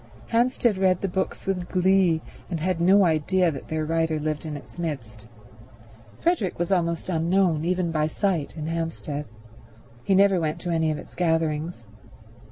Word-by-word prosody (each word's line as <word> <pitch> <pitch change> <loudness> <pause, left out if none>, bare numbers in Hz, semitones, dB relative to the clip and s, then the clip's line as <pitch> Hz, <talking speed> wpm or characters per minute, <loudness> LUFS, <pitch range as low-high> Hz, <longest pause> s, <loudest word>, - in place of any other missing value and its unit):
Hampstead 235 -3 +2
read 185 -2 +3
the 195 - 0
books 190 +1 -3
with 180 -2 -2
glee, 185 -3 +3 0.3
and 170 -3 -2
had 175 +1 -1
no 190 +3 +6
idea 170 +2 +2
that 140 - -8
their 155 0 -2
writer 160 0 0
lived 155 +1 -3
in 150 -1 -4
its 145 - -13
midst. 115 -10 -5 0.9
Frederick 330 - 0
was 175 +2 -2
almost 170 -3 0
unknown, 170 -1 +2
even 180 -1 0
by 155 -1 +1
sight, 170 -2 -1
in 155 - -4
Hampstead. 160 -3 -3 0.8
He 190 - +2
never 195 -1 +5
went 155 -2 -2
to 175 - -3
any 160 -1 +1
of 155 - -1
its - - -11
gatherings. 160 -5 -1
170 Hz, 165 wpm, -25 LUFS, 155-185 Hz, 0.9 s, no